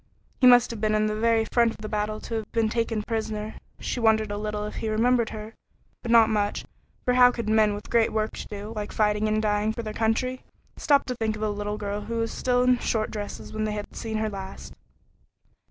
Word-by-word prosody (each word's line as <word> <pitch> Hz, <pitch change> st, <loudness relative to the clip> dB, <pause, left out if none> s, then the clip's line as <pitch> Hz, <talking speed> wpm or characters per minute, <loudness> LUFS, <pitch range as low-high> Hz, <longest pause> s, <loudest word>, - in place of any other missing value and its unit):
He 255 Hz, -, +6 dB
must 245 Hz, -1 st, +6 dB
have 225 Hz, -3 st, -7 dB
been 215 Hz, -1 st, +2 dB
in 215 Hz, 0 st, +2 dB
the 215 Hz, -, 0 dB
very 225 Hz, 0 st, +2 dB
front 235 Hz, -1 st, +4 dB
of -, -, -14 dB
the 215 Hz, -, -7 dB
battle 215 Hz, 0 st, -2 dB
to -, -, -7 dB
have 220 Hz, -2 st, -4 dB
been 225 Hz, -2 st, +2 dB
taken 225 Hz, -1 st, -1 dB
prisoner. 220 Hz, -1 st, -3 dB, 0.3 s
She -, -, -3 dB
wondered 220 Hz, -2 st, +3 dB
a 205 Hz, -, -3 dB
little 210 Hz, 0 st, -3 dB
if 210 Hz, -, -6 dB
he 220 Hz, -, -2 dB
remembered 235 Hz, +1 st, +2 dB
her, 215 Hz, +1 st, -8 dB, 0.5 s
but 235 Hz, -, -6 dB
not 230 Hz, -1 st, +7 dB
much, 210 Hz, -2 st, -1 dB, 0.4 s
for 250 Hz, -, +3 dB
how 250 Hz, 0 st, +7 dB
could 235 Hz, -3 st, -4 dB
men 215 Hz, -1 st, +3 dB
with 205 Hz, -, -8 dB
great 230 Hz, -1 st, +3 dB
work 215 Hz, 0 st, -1 dB
to -, -, -6 dB
do, 210 Hz, +1 st, -7 dB
like 210 Hz, -1 st, -4 dB
fighting 210 Hz, 0 st, +1 dB
and 215 Hz, 0 st, +1 dB
dying 210 Hz, 0 st, +1 dB
for 235 Hz, -, -5 dB
their 215 Hz, -1 st, -5 dB
country, 240 Hz, +4 st, 0 dB, 0.3 s
stop 285 Hz, -2 st, +3 dB
to 250 Hz, -, -3 dB
think 220 Hz, -2 st, -1 dB
of 215 Hz, -, -5 dB
a 215 Hz, -, +1 dB
little 205 Hz, 0 st, -3 dB
girl 205 Hz, 0 st, -3 dB
who 225 Hz, +3 st, -5 dB
was 230 Hz, 0 st, -1 dB
still 250 Hz, -1 st, +1 dB
in 250 Hz, -1 st, +3 dB
short 220 Hz, -1 st, -1 dB
dresses 205 Hz, -1 st, -6 dB
when 215 Hz, 0 st, -1 dB
they 215 Hz, -, -2 dB
had 210 Hz, -1 st, -6 dB
seen 220 Hz, -1 st, -3 dB
her 215 Hz, 0 st, -1 dB
last? 195 Hz, -1 st, -8 dB
220 Hz, 235 wpm, -26 LUFS, 210-230 Hz, 0.5 s, not